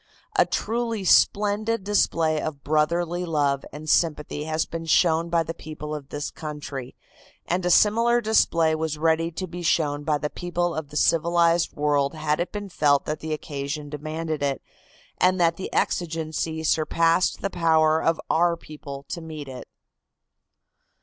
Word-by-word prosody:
A - - +4
truly 230 -2 -2
splendid 210 +3 +3
display 165 -6 +1
of 145 -3 -5
brotherly 170 +4 0
love 145 -5 0
and 150 +2 -9
sympathy 150 -2 +1
has 160 0 0
been 165 0 -6
shown 165 0 +3
by 170 -1 +2
the 165 - -5
people 155 -1 -7
of 145 -2 -7
this 145 0 -4
country, 145 -4 -7 0.5
and 180 +2 -1
a 180 - +1
similar 230 +6 +4
display 170 -8 +3
was 155 -1 -2
ready 165 +1 +2
to 185 +3 -4
be 175 0 -8
shown 150 -3 +1
by 150 0 +1
the 150 0 -4
people 175 -1 -2
of 155 -3 -5
the 150 - -5
civilized 170 +1 +3
world 145 0 +1
had 155 0 -1
it 175 - -2
been 205 -1 -6
felt 145 -5 +2
that 155 0 -3
the 160 - -6
occasion 145 -1 -4
demanded 155 +1 -4
it 140 -1 -1 0.6
and 185 0 +3
that 165 -1 +3
the 190 - -6
exigency 160 -1 -1
surpassed 165 +3 +2
the 195 - -1
power 160 -2 +3
of 165 0 +1
our 170 +1 +2
people 140 -3 -9
to 170 - -5
meet 155 -3 -8
it. 130 -1 -9
160 Hz, 160 wpm, -24 LUFS, 150-175 Hz, 0.6 s, A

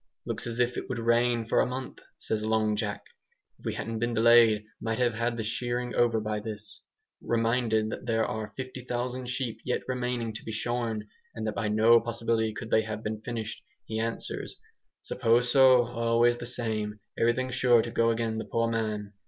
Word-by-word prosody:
"Looks - - -3
as 115 -1 -4
if 120 0 +1
it - - -5
would 125 - -2
rain 120 0 +2
for - - +2
a - - +1
month," 130 +1 -5 0.2
says 110 -1 -2
Long 110 -1 +1
Jack. 105 -1 -3 0.6
"If - - -18
we - - -2
hadn't 115 0 -4
been 120 +1 -1
delayed 115 -2 +6 0.2
might 115 -1 -1
have 120 -2 +2
had 115 +1 -1
the 110 - -2
shearing 120 +2 -2
over 120 -2 +3
by 105 0 -2
this." 105 -1 -8 0.4
Reminded 115 -2 +1
that - - -6
there 115 -1 +2
are 110 -1 -4
50,000 125 -1 -4
sheep 125 -3 -2
yet 125 - -1
remaining 125 -3 -2
to 110 - -8
be 110 - -5
shorn, 115 -1 -2 0.3
and 110 -1 -4
that 110 - -1
by 105 - -2
no 110 +2 +6
possibility 115 -1 0
could 110 +1 -7
they 110 - +5
have 110 0 -5
been 110 0 -3
finished, 115 -2 -5 0.2
he 110 0 -3
answers, 115 +1 -3 0.4
"Suppose 120 +2 +2
so, 130 -2 +7
always 120 0 +2
the 120 - -6
same, 110 -3 -3 0.2
everything 125 +3 +1
sure 120 -2 +4
to 115 - -5
go 115 0 +2
agin 115 -1 -1
the - - -4
poor 115 0 0
man." 105 -2 -2
115 Hz, 190 wpm, -28 LUFS, 110-120 Hz, 0.6 s, so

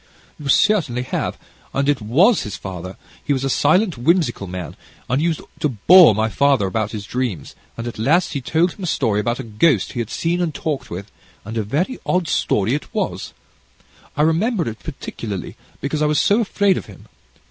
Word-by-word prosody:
"You 145 - -6
certainly 145 - +3
have, - - -3 0.4
and 140 +1 +1
it 145 -4 +2
was 165 - +4
his 105 - -5
father: 95 -1 -7 0.3
he 145 - +1
was 135 -1 -2
a 135 - 0
silent, 165 - +2
whimsical 140 - +1
man, 90 -3 -6 0.3
and 130 +4 +1
he 165 - +2
used 165 -2 -1 0.2
to 150 - +1
bore 130 - +7
my 110 +1 +1
father 140 -2 +2
about 105 +2 -1
his 105 -2 -6
dreams, 120 - -3 0.2
and 115 - -5
at 120 -2 -6
last 160 +12 +2
he 140 - -2
told 160 +7 +1
him 195 - -10
a - - -3
story 115 -9 +1
about 120 +4 -1
a - - -4
ghost 115 - +1
he - - -5
had 115 -2 -3
seen 170 +2 -1
and 165 -4 -1
talked 150 -4 -3
with, 95 +4 -7 0.3
and 110 +2 -6
a 115 - 0
very 150 - -2
odd 180 -2 0
story 105 -4 +1
it 150 - -4
was. - - -3 0.8
I 150 - +3
remember 175 - +1
it 110 -1 -5
particularly, 110 - -6 0.3
because 145 +3 -2
I 150 - +3
was 150 0 +2
so 205 +3 +3
afraid 200 -2 +2
of - - -6
him. - - -14
135 Hz, 200 wpm, -20 LUFS, 110-165 Hz, 0.8 s, bore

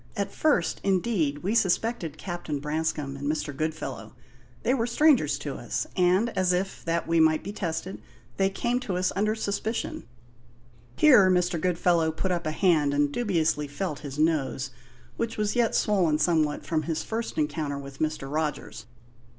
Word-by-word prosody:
At 200 -1 -1
first, 290 - +1
indeed, 180 -7 0
we 200 +4 0
suspected 195 -5 0
Captain 175 -5 -4
Branscome 150 -1 -2
and 140 +2 -2
Mr. 150 -2 -3
Goodfellow: 135 -7 -4 0.5
they 250 - +2
were 235 -3 0
strangers 295 +4 +3
to - - -5
us, - - -3
and, 185 +5 +3
as 185 -1 +2
if 190 +2 -2
that 165 0 -1
we 165 0 +2
might 160 -1 +4
be 200 - -6
tested, 175 -1 -4 0.4
they 195 0 +3
came 240 +5 -1
to 200 -8 -3
us 180 0 +1
under 215 +2 +1
suspicion." 220 +1 -3 0.9
Here 245 -11 +6
Mr. 180 -2 +1
Goodfellow 170 -2 +2
put 185 +4 -2
up 170 -2 -1
a - - 0
hand 155 -5 +2
and 145 0 +2
dubiously 160 -7 0
felt 145 +1 -4
his 145 -2 -7
nose, 150 -4 0 0.5
which 230 -1 -2
was 210 +1 0
yet 235 -2 +2
swollen 180 -8 +2
somewhat 155 -2 +1
from 160 -2 0
his 160 -1 -3
first 225 +1 -4
encounter 150 -1 -1
with 140 -1 -9
Mr. 155 -3 -2
Rogers. 150 -6 -3
170 Hz, 165 wpm, -27 LUFS, 150-200 Hz, 0.9 s, Here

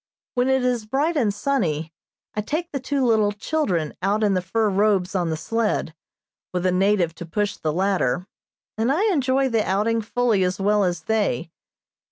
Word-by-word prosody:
When 250 0 +1
it 265 -1 +2
is 240 -4 0
bright 290 +8 0
and 235 -8 +2
sunny, 175 - -1 0.4
I 210 - -1
take 320 - -3
the 275 - -2
two 265 0 -1
little 220 -3 +3
children 205 - -1
out 205 +3 +1
in 205 -2 +3
the 185 - +1
fur 215 +5 0
robes 200 -2 +2
on 175 -3 0
the 160 - -1
sled, 220 -2 -1 0.6
with 180 0 -2
a 185 - +3
native 185 -2 +2
to 170 - -8
push 205 +4 -1
the 155 - -2
latter, 180 -2 0 0.5
and 230 +4 +2
I 330 +9 +1
enjoy 270 -2 +2
the 225 -3 +1
outing 215 +4 +1
fully 225 -2 +1
as 185 +2 -1
well 205 +1 +2
as 175 -2 -1
they. 205 - 0
210 Hz, 185 wpm, -23 LUFS, 185-245 Hz, 0.6 s, little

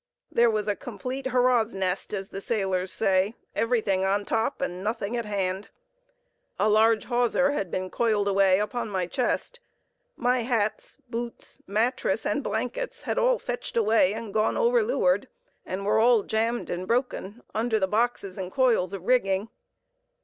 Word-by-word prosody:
There 235 0 +4
was 215 -1 -1
a 205 - +1
complete 255 +5 -5
"hurrah's 245 -4 +2
nest," 190 0 -2
as 195 -2 -4
the 195 - -6
sailors 190 -4 -1
say, 195 +1 +1 0.2
"everything 220 -5 +1
on 200 +1 +1
top 225 +5 -1
and 185 -9 -3
nothing 220 +1 -2
at 235 -1 -2
hand." 195 -1 -2 0.9
A 210 - +2
large 220 +1 +4
hawser 245 +3 +2
had 200 -10 -2
been 185 +2 -3
coiled 215 -3 +1
away 195 -1 +4
upon 220 +2 -2
my 190 -3 -1
chest; 260 - -2 0.6
my 250 0 +2
hats, 225 -3 -1
boots, 235 0 -6
mattress 220 0 0
and 265 +7 0
blankets 245 - -3
had - - -1
all - - +3
fetched 245 - -5
away 215 -3 +3
and 225 -3 -6
gone 215 0 +1
over 485 0 +3
leeward, - - +1 0.4
and 195 +2 -4
were 225 +1 +4
jammed 225 +3 -1
and 180 +1 -4
broken 240 -3 -2
under 220 0 +1
the 190 - +1
boxes 210 -3 -1
and 185 -1 -4
coils 230 -7 +2
of 195 -3 -5
rigging. 200 -3 +1
220 Hz, 155 wpm, -26 LUFS, 195-245 Hz, 0.9 s, There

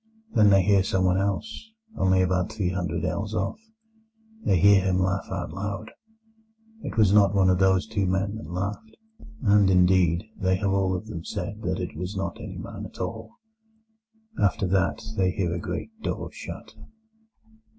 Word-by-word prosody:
Then 105 -1 +5
they 95 -1 +5
hear 100 0 +4
someone 95 -1 +1
else, 100 - -3 0.3
only 95 0 +3
about 90 +2 0
three 100 -5 -1
hundred 85 -2 -2
ells 105 +4 -2
off. 215 - -2 0.8
They 95 - +3
hear 100 +2 +6
him 95 -1 +1
laugh 95 +1 0
out - - -4
loud: 100 +2 -5 0.9
it - - -6
was 105 -3 +5
not 100 -1 +5
one 95 -1 +4
of 90 - +1
those 95 0 +3
two 105 -3 -1
men 95 +2 0
that 80 - -9
laughed, 100 - -5 0.5
and, 100 -3 +5
indeed, 90 -1 +4
they 95 -2 +1
have 100 +1 -1
all 95 -1 +1
of 90 - -5
them 100 -7 -7
said - - -5
that - - -2
it - - -5
was 90 +5 -5
not 95 - -3
any - - -7
man - - -7
at - - -17
all. - - -5 1.1
After 100 0 +2
that 95 0 +1
they 95 -1 +3
hear 90 -3 -1
a 85 - -3
great 220 - -5
door - - -4
shut. - - -9
95 Hz, 170 wpm, -26 LUFS, 90-100 Hz, 1.1 s, hear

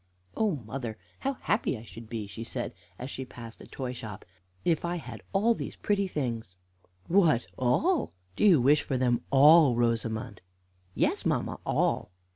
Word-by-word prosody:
"Oh, 215 -6 +1
mother, 115 -1 -5 0.2
how 275 - -1
happy 205 - 0
I 110 - -10
should 115 -1 -11
be," 110 -2 -4
she 110 +3 -7
said, 115 - -4 0.2
as 125 +2 -6
she 130 - -4
passed 115 -3 -10
a - - -11
toy 130 -2 -5
shop, 105 -4 -8 0.4
"if 165 -3 +2
I 175 +1 -1
had 125 -9 -7
all 210 +4 +3
these - - -6
pretty 200 -2 0
things!" 115 - -3 0.5
"What, 165 -9 +4
all! 265 - +2 0.2
Do - - -1
you 185 -8 +7
wish 140 +4 +5
for 135 - -2
them 125 -1 +2
all, 145 0 +7
Rosamond?" 115 -3 -1 0.5
"Yes, - - +1
mamma, - - -1
all." - - +1
130 Hz, 165 wpm, -29 LUFS, 115-170 Hz, 0.5 s, you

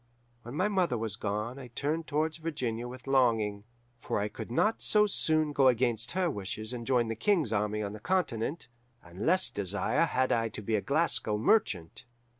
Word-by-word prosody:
When 120 +3 -9
my 185 +6 +2
mother 185 - +1
was 110 -2 -2
gone 105 +4 -3
I 130 - -9
turned 150 +7 -3
towards 155 +1 -1
Virginia 130 -8 -3
with 125 0 -10
longing, 115 -6 +1 0.3
for - - -2
I 105 +1 -1
could - - -8
not 215 - +1
so 210 -1 +3
soon 155 -6 +1
go 135 -2 +4
against 120 -2 +1
her 185 0 +1
wishes 110 - -4
and 120 -2 -6
join 125 -3 +3
the 115 0 -3
King's 170 - +1
army 105 0 0
on 100 0 -4
the 105 - -8
Continent, 160 - -1 0.4
and 90 +5 -6
less 185 +2 +5
desire 105 - 0
had 130 -4 0
I 115 -1 +1
to 105 - -7
be 110 - -2
a 105 - +1
Glasgow 140 -7 +1
merchant. 105 - +1
120 Hz, 190 wpm, -30 LUFS, 110-155 Hz, 0.4 s, less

